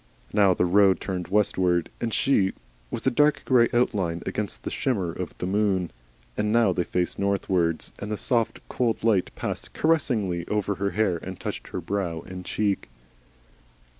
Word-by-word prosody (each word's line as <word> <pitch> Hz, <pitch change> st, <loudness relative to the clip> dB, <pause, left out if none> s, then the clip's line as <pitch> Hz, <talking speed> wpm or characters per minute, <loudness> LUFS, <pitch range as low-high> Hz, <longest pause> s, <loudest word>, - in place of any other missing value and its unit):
Now 100 Hz, -3 st, +5 dB
the 90 Hz, -, +2 dB
road 95 Hz, +1 st, +4 dB
turned 90 Hz, -3 st, -4 dB
westward, 95 Hz, -4 st, +1 dB
and 115 Hz, -, -1 dB
she 100 Hz, -6 st, +2 dB, 0.4 s
was -, -, -5 dB
a -, -, +4 dB
dark 150 Hz, +3 st, +3 dB
grey 120 Hz, -3 st, +4 dB
outline 95 Hz, -9 st, 0 dB
against 105 Hz, -3 st, -3 dB
the -, -, -4 dB
shimmer 100 Hz, -10 st, -1 dB
of 90 Hz, +1 st, -6 dB
the -, -, -3 dB
moon; 95 Hz, -2 st, +1 dB, 0.4 s
and 105 Hz, 0 st, 0 dB
now 115 Hz, -4 st, +4 dB
they 90 Hz, -, 0 dB
faced 90 Hz, -1 st, -1 dB
northwards, 95 Hz, -4 st, 0 dB
and 105 Hz, -, -5 dB
the 105 Hz, -, -1 dB
soft 115 Hz, -1 st, -1 dB
cold 115 Hz, -4 st, -1 dB
light 105 Hz, -5 st, +3 dB
passed -, -, -5 dB
caressingly 110 Hz, -, +1 dB
over 105 Hz, -1 st, 0 dB
her 100 Hz, +1 st, -1 dB
hair 100 Hz, -4 st, +1 dB
and 95 Hz, +2 st, -8 dB
touched -, -, -5 dB
her 90 Hz, -, -5 dB
brow 85 Hz, -2 st, -2 dB
and 90 Hz, +1 st, -9 dB
cheek. 100 Hz, -2 st, -1 dB
100 Hz, 165 wpm, -25 LUFS, 90-110 Hz, 0.4 s, Now